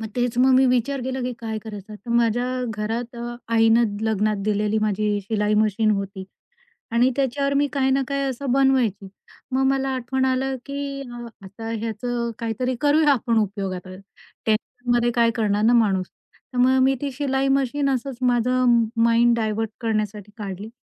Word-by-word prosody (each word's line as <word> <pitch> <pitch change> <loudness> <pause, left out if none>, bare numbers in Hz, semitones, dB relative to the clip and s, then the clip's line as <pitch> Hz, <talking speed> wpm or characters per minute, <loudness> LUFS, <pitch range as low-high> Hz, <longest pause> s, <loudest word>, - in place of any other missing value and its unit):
मग 220 - -5
तेच 245 -1 0
मग 260 +1 +5
मी 265 +1 +5
विचार 255 +2 +1
केला, 260 +1 -3
की 250 0 -2
काय 220 -1 -4
करायचं? 210 -1 -9
तर 210 +3 -10
माझ्या 235 +1 +2 0.3
घरात 230 +3 -4
अ, 240 0 -5 0.2
आईनं 225 -1 +4
लग्नात 215 -1 +1
दिलेली 210 +1 +1
माझी 210 0 0
शिलाई 210 +1 0
मशीन 215 0 +2
होती. 195 -1 -3 0.7
आणि 240 +3 +3
त्याच्यावर 275 +1 0
मी 285 +1 +3
काही 265 -2 +1
ना 270 +1 +2
काही 275 0 -1
असं 265 -1 -2
बनवायची. 255 -8 +2 0.4
मग 265 +1 +2
मला 270 0 0
आठवण 260 +1 -1
आली, 260 0 +1 0.2
की 280 0 -4
अ, 240 0 -7 0.2
आता 215 +4 -8
ह्याचं 230 +2 -3
काहीतरी 245 +2 -2
करूया 295 0 +4
आपण 235 -3 +1
उपयोग 200 -2 -2
आता. 185 +1 -8 0.5
टेन्शनमध्ये 240 +2 0
काय 235 -1 +4
करणार 210 -2 +1
ना 235 - +5
माणूस? 195 -6 +3 0.5
तर 250 - -4
मग 260 +1 +4
मी 270 +1 +4
ती 285 - -2
शिलाई 270 0 0
मशीन 275 +2 -1
असंच 260 0 -2
माझं 245 0 +3 0.2
माइंड 235 +1 +4
डायव्हर्ट 220 -1 -1
करण्यासाठी 215 -2 -2
काढली. 200 -1 -6
235 Hz, 165 wpm, -23 LUFS, 215-260 Hz, 0.7 s, मग